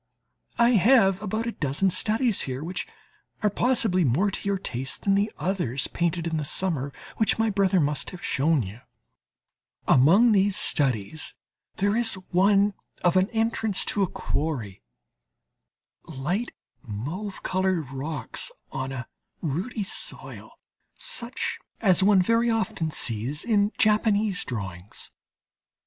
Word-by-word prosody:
I 235 +1 +5
still 190 - +2
have 195 -5 +3
about 215 +2 -2
a 235 - -2
dozen 160 +3 0
studies 220 +3 +1
here, 130 +3 -4
which 180 +3 -4 0.6
are 210 - +3
possibly 220 -6 +2
more 165 - +2
to 200 - -3
your 200 - +1
taste 130 -7 -4
than 195 - +2
the 205 +2 +1
others 175 - 0
painted 170 -1 -1
in 165 -1 -1
the 155 - -2
summer, 145 -3 0 0.3
which 220 - +2
my 225 -1 +1
brother 195 -2 +2
must 145 -2 0
have 180 -2 -9
shown 145 -1 +2
you. 100 +4 -9 1.1
Among 185 - +6
these 200 -1 +3
studies 135 - 0 0.4
there 200 +2 +1
is 230 -2 +1 0.2
one 200 +2 +4 0.3
of 175 0 +3
an 185 +2 +3
entrance 225 -3 +1
to 205 - 0
a 195 - +3
quarry: 125 -11 -3 1.2
light 165 - -3 0.3
mauve 145 - -6
coloured 185 -7 -1
rocks 135 -1 -4 0.2
on 130 0 -4
a 130 -1 -6 0.4
ruddy 185 - -2
soil, 195 - -4 0.5
such 255 - 0 0.2
as 190 -5 +3
one 195 -1 +5
very 230 +4 +2
often 195 -7 -1
sees 125 +2 +1
in 210 -3 +2
Japanese 215 -3 +2
drawings. 95 -5 -7
185 Hz, 135 wpm, -25 LUFS, 140-210 Hz, 1.2 s, Among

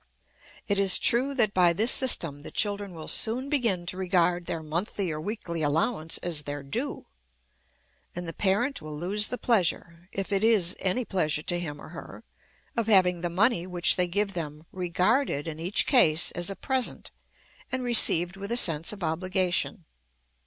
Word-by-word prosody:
It 200 -1 0
is 195 -2 +6
true 265 +4 +2
that 215 -6 +1
by 175 -2 +3
this 220 +7 +2
system 165 - +5
the 145 - -10
children 205 -3 -2
will 160 -1 -9
soon 245 +4 +1
begin 230 -12 0
to 180 +1 -5
regard 175 -2 0
their 165 -1 -4
monthly 175 +3 -3
or 155 0 -5
weekly 170 -4 -5
allowance 155 +3 0
as 170 -4 -1
their 145 -1 -7
due; 240 - -5 1.1
and 175 0 -6
the 165 - -6
parent 220 - -1
will 155 -1 -8
lose 200 +6 -1
the 250 - -5
pleasure, 175 -6 -2
if 195 +1 -5
it 200 +1 0
is 205 -6 +2
any 215 +6 -1
pleasure 155 -7 -1
to 175 +1 -2
him 150 -4 -7
or - - -12
her, 165 +1 -11 0.5
of 230 -2 -2
having 180 -5 +3
the 175 - -3
money 185 0 +1
which 175 -1 +3
they 180 -1 +1
give 200 +3 -2
them 155 -3 -7
regarded 180 - -1
in 160 -1 -7
each 180 +5 0
case 170 - +4
as 175 +1 -3
a 195 - -5
present, 260 +2 -2 0.6
and 260 0 -3
received 185 -7 +5
with 200 +2 -7
a 235 - +1
sense 165 -7 +3
of 205 -3 -9
obligation. 180 +1 -2
180 Hz, 175 wpm, -26 LUFS, 165-210 Hz, 1.1 s, is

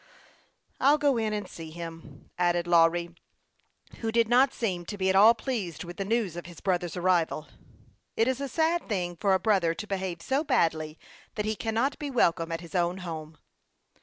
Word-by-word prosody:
" - - -36 0.3
I'll 285 +3 +5
go 285 -2 +2
in 220 -1 0
and 205 -2 -3
see 165 -3 -9
him," 165 -3 -10
added 175 -1 +1
Lawry, 170 0 +3 0.9
who 225 -1 -2
did 230 0 +3
not 255 +3 +4
seem 190 -9 -2
to 205 - -5
be 190 -1 +2
at - - 0
all 215 +4 +8
pleased 215 - -4
with 175 0 -9
the 195 - -2
news 215 -5 0
of 175 0 -7
his 175 -3 -11
brother's 180 -2 -1
arrival. 175 -4 +1 0.7
It 225 - +3
is 260 +1 -1
a 280 - -3
sad 325 +4 0
thing 180 -4 -2
for 190 +2 +2
a - - +1
brother 185 -5 +2
to 200 - -6
behave 190 -4 -4
so 270 +3 0
badly 160 - 0 0.4
that 210 - -2
he 215 0 -1
cannot 230 +6 -1
be 295 - -4
welcome 170 -9 +1
at 165 0 -3
his 170 +1 -12
own 175 0 +1
home. 160 -2 -7
185 Hz, 195 wpm, -28 LUFS, 170-230 Hz, 0.9 s, all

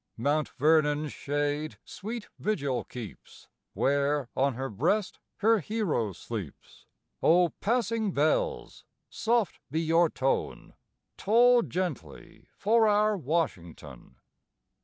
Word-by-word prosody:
Mt. 145 +5 0
Vernon's 150 0 +2
shade 145 +1 -2
sweet 225 +2 -7
vigil 145 -12 -1
keeps 115 -6 -10 0.3
Where 140 -1 +1
on 135 -1 +1
her 135 +2 -3
breast 170 - -1 0.2
her 225 +1 +4
hero 175 - -1
sleeps; 100 - -8 0.3
O 175 +1 +4
passing 225 -2 0
bells, 455 - -1 0.3
soft 230 -2 0
be 155 +4 -1
your 165 +1 +3
tone, 135 -2 -2 0.4
Toll 240 +4 +5
gently 165 - -5
for 220 +2 +3
our 210 0 +3
Washington. 90 - -4
155 Hz, 100 wpm, -28 LUFS, 135-215 Hz, 0.4 s, Toll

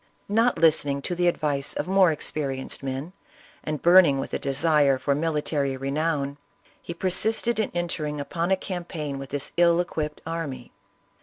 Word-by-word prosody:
Not 230 +4 +2
listening 145 -4 +2
to - - -1
the 175 0 +1
advice 145 -5 -1
of - - -3
more 190 -2 +4
experienced 140 -3 -4
men, 135 +6 -5 0.5
and 150 -2 -4
burning 175 -5 +6
with 135 - -5
a - - -1
desire 140 0 +2
for 140 +2 0
mili 150 0 -1
tary 140 -3 -1
renown, 140 +1 -2 0.4
he 170 - -7
persisted 220 +6 +1
in 215 - 0
entering 155 -4 -2
upon 170 +4 -2
a 190 - +3
campaign 170 -7 -5
with 135 -1 -8
this 145 0 -3
ill 170 0 +4
equipped 155 -4 -3
army. 155 -7 -5
155 Hz, 160 wpm, -25 LUFS, 140-175 Hz, 0.5 s, burning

